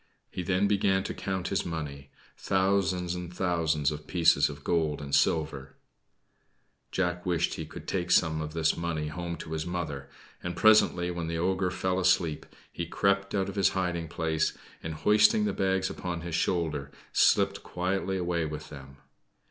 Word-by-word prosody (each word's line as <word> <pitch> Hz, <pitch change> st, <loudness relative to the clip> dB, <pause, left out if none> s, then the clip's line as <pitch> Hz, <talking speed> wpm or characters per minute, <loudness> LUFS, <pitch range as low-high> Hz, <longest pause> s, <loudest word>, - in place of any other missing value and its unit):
He -, -, -4 dB
then 95 Hz, +3 st, +1 dB
began 95 Hz, -1 st, +2 dB
to -, -, -4 dB
count 95 Hz, -2 st, -3 dB
his 100 Hz, -, 0 dB
money 75 Hz, -4 st, -5 dB, 0.3 s
thousands 95 Hz, -2 st, +1 dB
and 90 Hz, -1 st, -6 dB
thousands 80 Hz, -5 st, +1 dB
of 75 Hz, 0 st, -7 dB
pieces 80 Hz, -5 st, +4 dB
of 70 Hz, -1 st, -9 dB
gold 80 Hz, -3 st, 0 dB
and 70 Hz, -1 st, -7 dB
silver. 75 Hz, -4 st, +1 dB, 1.2 s
Jack 90 Hz, -2 st, -1 dB
wished 85 Hz, -2 st, 0 dB
he 80 Hz, -, -5 dB
could -, -, -10 dB
take -, -, -2 dB
some 80 Hz, -1 st, +3 dB
of 75 Hz, 0 st, -5 dB
this 80 Hz, -1 st, +2 dB
money 80 Hz, -3 st, -2 dB
home 85 Hz, +1 st, -4 dB
to 80 Hz, -, -9 dB
his 80 Hz, -1 st, -2 dB
mother; 75 Hz, -6 st, -4 dB, 0.3 s
and, 90 Hz, 0 st, -4 dB
presently, 90 Hz, -5 st, +4 dB
when 85 Hz, -2 st, -4 dB
the 85 Hz, 0 st, -2 dB
ogre 95 Hz, +2 st, +1 dB
fell 90 Hz, +1 st, -1 dB
asleep, 90 Hz, -4 st, +1 dB, 0.2 s
he 85 Hz, -, -4 dB
crept 100 Hz, +2 st, +1 dB
out 95 Hz, -1 st, +1 dB
of 100 Hz, -, -5 dB
his 95 Hz, -2 st, +4 dB
hiding 90 Hz, -3 st, -1 dB
place, 80 Hz, 0 st, -1 dB, 0.2 s
and 80 Hz, -1 st, -5 dB
hoisting 210 Hz, -, +4 dB
the 210 Hz, -, 0 dB
bags 95 Hz, -1 st, +1 dB
upon 90 Hz, -2 st, -4 dB
his 85 Hz, 0 st, -6 dB
shoulder, 80 Hz, -5 st, 0 dB, 0.2 s
slipped -, -, +3 dB
quietly 95 Hz, +1 st, -2 dB
away 85 Hz, -2 st, -1 dB
with 75 Hz, -1 st, -5 dB
them. 70 Hz, -1 st, -11 dB
85 Hz, 170 wpm, -28 LUFS, 80-95 Hz, 1.2 s, pieces